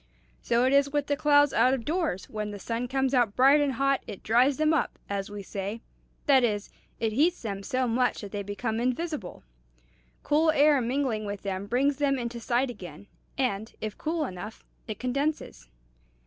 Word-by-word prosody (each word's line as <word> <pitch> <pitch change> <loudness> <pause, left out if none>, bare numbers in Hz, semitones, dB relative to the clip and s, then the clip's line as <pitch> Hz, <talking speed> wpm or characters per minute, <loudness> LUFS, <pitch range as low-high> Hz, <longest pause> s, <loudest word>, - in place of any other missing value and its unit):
So 235 +1 +2
it 260 - +2
is 280 0 +4
with 290 -1 0
the 285 - 0
clouds 290 -1 +4
out 255 +1 +4
of 235 -4 -7
doors; 315 - -1
when 215 -1 -4
the 205 - -6
sun 230 +5 -3
comes 265 +1 0
out 240 -5 +2
bright 275 +3 +6
and 285 -2 +1
hot, 275 +2 +1
it 195 - -8
dries 250 +5 +3
them 310 +1 +3
up, 315 - 0
as 200 0 -3
we 205 -1 -7
say; 200 +4 -5 0.4
that 270 -3 +5
is, 210 -3 -1 0.3
it 220 -1 0
heats 320 +8 +2
them 200 -3 -4
so 255 +4 -1
much 245 +2 +1
that 205 -2 -8
they 205 - -3
become 220 +3 -3
invisible. 255 - -3 0.8
Cool 310 +2 +3
air 290 -2 +4
mingling 240 -3 -1
with 205 -1 -5
them 195 0 -3
brings 265 +5 +1
them 280 -1 +1
into 235 -1 -4
sight 245 +2 0
again; 180 -4 -10 0.3
and, 220 -5 -1
if 215 -1 -4
cool 315 0 -2
enough, 200 0 -8 0.2
it 215 - -5
condenses." 275 - -3
250 Hz, 190 wpm, -27 LUFS, 210-280 Hz, 0.8 s, bright